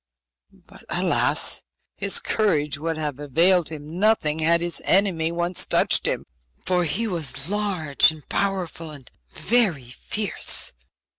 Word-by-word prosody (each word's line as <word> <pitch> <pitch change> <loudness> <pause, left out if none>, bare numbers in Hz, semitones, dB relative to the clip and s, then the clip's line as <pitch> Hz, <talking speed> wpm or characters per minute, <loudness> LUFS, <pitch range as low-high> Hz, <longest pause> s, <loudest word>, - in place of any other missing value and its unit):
But, - - -17
alas! - - +2 0.3
his 200 0 +2
courage 155 -9 0
would 165 +1 -3
have 150 -3 -4
availed 165 +5 +2
him 155 +2 -8
nothing 195 -8 +1
had 165 +2 +2
his 175 0 0
enemy 180 -4 +1
once 175 +1 +1
touched - - +2
him, - - -3 0.4
for 180 -1 +1
he 195 +9 -1
was 165 -6 -2
large 190 -9 +2
and 155 -2 -11
powerful, 185 -5 -2
and 140 -5 -12 0.2
very 170 - 0
fierce. 210 +10 +1
170 Hz, 130 wpm, -23 LUFS, 150-195 Hz, 0.4 s, alas